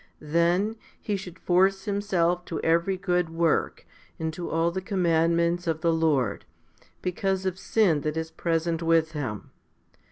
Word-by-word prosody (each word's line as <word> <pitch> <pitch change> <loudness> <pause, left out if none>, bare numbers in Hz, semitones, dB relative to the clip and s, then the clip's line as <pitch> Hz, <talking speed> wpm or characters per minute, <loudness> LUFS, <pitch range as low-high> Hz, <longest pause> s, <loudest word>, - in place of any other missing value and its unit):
Then 180 +6 +2 0.2
he 210 - -2
should 185 -2 -7
force 190 +2 +2
himself 185 -4 0
to 165 - -4
every 170 +4 +2
good 180 -2 0
work 165 0 0 0.3
and 160 0 -3
to 175 +2 -5
all 165 +1 +1
the 190 +2 -3
commandments 170 -2 +1
of 160 -1 -1
the 165 0 +2
Lord, 145 -10 +1 0.6
because 190 +1 -1
of 185 0 -2
sin 185 -11 +2
that 155 +1 -2
is 160 0 -3
present 165 0 -1
with 165 -1 +2
him. 130 -10 -5
170 Hz, 150 wpm, -26 LUFS, 165-185 Hz, 0.6 s, Then